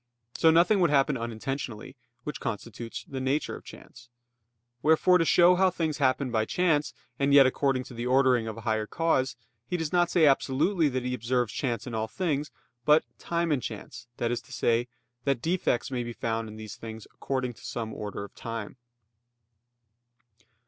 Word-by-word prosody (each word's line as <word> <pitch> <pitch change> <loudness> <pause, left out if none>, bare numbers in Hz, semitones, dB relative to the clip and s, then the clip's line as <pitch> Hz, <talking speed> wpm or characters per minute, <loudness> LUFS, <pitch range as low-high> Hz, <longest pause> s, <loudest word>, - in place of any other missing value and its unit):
So 165 - +5
nothing 170 +6 +5
would 175 -3 +4
happen 140 0 +3
unintentionally; 120 +1 -5 0.3
which 150 - -5
constitutes 115 +2 -5
the 135 -5 -5
nature 135 +3 -1
of - - -11
chance. 120 -1 -14 0.7
Wherefore 160 +4 +4
to 165 - +2
show 175 +2 +6
how 190 0 +4
things 160 -4 -2
happen 130 -1 +1
by 110 -2 +2
chance 155 -1 +1 0.3
and 140 0 +3
yet 140 -1 +9
according 130 0 +1
to 130 - -12
the 120 +1 -4
ordering 130 -3 +3
of 110 0 -5
a - - -7
higher 110 -1 -1
cause, 135 -5 +1 0.3
he 180 - -1
does 160 -1 -3
not 175 -1 +3
say 170 -3 +4
absolutely 150 +5 +3
that 130 -1 -3
he 125 - -1
observes 120 -1 -1
chance 120 -4 -2
in 125 - -6
all 110 0 -1
things, 150 +3 -2 0.3
but 150 +3 +5 0.2
"time 170 -1 -1
and 140 -4 +1
chance," 120 - -7
that 120 0 -1
is 120 - -1
to - - -19
say, 120 +1 +1 0.4
that 140 -3 +1
defects 160 -4 0
may 125 -2 -1
be 120 0 -6
found 115 -1 -2
in 110 - -10
these 110 -1 -8
things 110 -1 -8
according 130 -2 -2
to - - -18
some 110 -2 -4
order 105 -1 -5
of 100 - -10
time. 115 0 -6
130 Hz, 185 wpm, -28 LUFS, 115-155 Hz, 0.7 s, yet